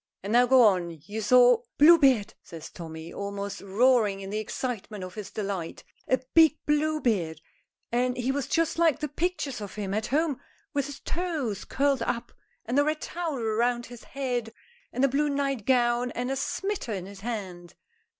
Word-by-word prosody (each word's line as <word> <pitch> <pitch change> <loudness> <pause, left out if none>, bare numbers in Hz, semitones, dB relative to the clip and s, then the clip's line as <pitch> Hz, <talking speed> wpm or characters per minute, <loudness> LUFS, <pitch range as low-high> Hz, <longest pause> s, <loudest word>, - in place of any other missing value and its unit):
"And 205 +3 -3
now 245 +1 +5
go 260 0 +6
on. 175 -6 +2
You 215 +2 -5
saw 245 +1 +6
" - - -60
"Bluebeard!" 275 -9 +6
says 165 -2 -10
Tommy, 160 -1 -8
almost 200 0 -5
roaring 210 0 +3
in 195 0 -7
the 215 - -1
excitement 215 -3 -4
of 185 0 -7
his 210 -2 -7
delight. 195 -5 -4 0.2
"A 255 - +3 0.2
big 320 -1 +6
Bluebeard, 260 - 0 0.5
and 250 +1 0
he 250 +1 0
was 275 -1 -2
just 330 +2 0
like 330 -4 +4
the 300 0 -3
pictures 300 -5 -2
of 200 -2 -7
him 200 -2 -3
at 215 +1 -1
home, 295 0 0 0.3
with 280 -1 0
his 285 - -9
toes 310 - -3
curled 275 -2 +1
up 235 0 -2 0.3
and 245 +5 +1
a - - +5
red 305 +1 -1
towel 330 -6 -3
round 240 +2 0
his 245 -2 -12
head 250 -4 -3 0.4
and 265 - +2
a - - +5
blue 290 +3 +1
night 275 -5 -2
gown 245 -1 +2
and 250 +2 -2
a - - 0
smiter 385 - -3
in 185 -3 -4
his 200 0 -11
hand." 190 -6 -6
245 Hz, 180 wpm, -27 LUFS, 200-280 Hz, 0.5 s, go